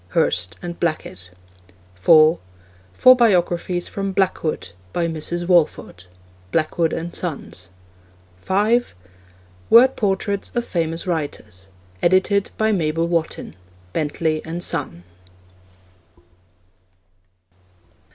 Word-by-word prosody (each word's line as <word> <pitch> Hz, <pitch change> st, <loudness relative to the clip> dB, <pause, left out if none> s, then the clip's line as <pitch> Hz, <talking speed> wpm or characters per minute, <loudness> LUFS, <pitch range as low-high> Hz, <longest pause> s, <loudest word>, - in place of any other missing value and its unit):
(Hurst 90 Hz, 0 st, 0 dB
and 170 Hz, -1 st, -6 dB
Blackett.) 95 Hz, -, -3 dB, 0.6 s
(4) 155 Hz, -, +5 dB, 0.5 s
Four 255 Hz, -, +6 dB
Biographies 180 Hz, -6 st, +1 dB
from 195 Hz, -1 st, -4 dB
'Blackwood.' 160 Hz, -, -1 dB, 0.2 s
By 170 Hz, -, 0 dB
Mrs. 165 Hz, +2 st, -4 dB
Walford. 155 Hz, -, +1 dB, 0.5 s
(Blackwood 160 Hz, 0 st, 0 dB
and 170 Hz, +1 st, -4 dB
Sons.) 140 Hz, -, -5 dB, 0.7 s
(5) 210 Hz, -, +1 dB, 0.7 s
Word 255 Hz, +3 st, +7 dB
Portraits 200 Hz, -1 st, -1 dB
of 240 Hz, 0 st, 0 dB
Famous 165 Hz, 0 st, -2 dB
Writers. 140 Hz, -, -4 dB, 0.3 s
Edited 190 Hz, +3 st, +2 dB
by 220 Hz, 0 st, +2 dB
Mabel 165 Hz, -3 st, 0 dB
Wotton. 170 Hz, -2 st, -2 dB, 0.4 s
(Bentley 155 Hz, 0 st, -1 dB
and 170 Hz, +2 st, -5 dB
Son.) 140 Hz, -, -4 dB
170 Hz, 90 wpm, -21 LUFS, 155-190 Hz, 0.7 s, Word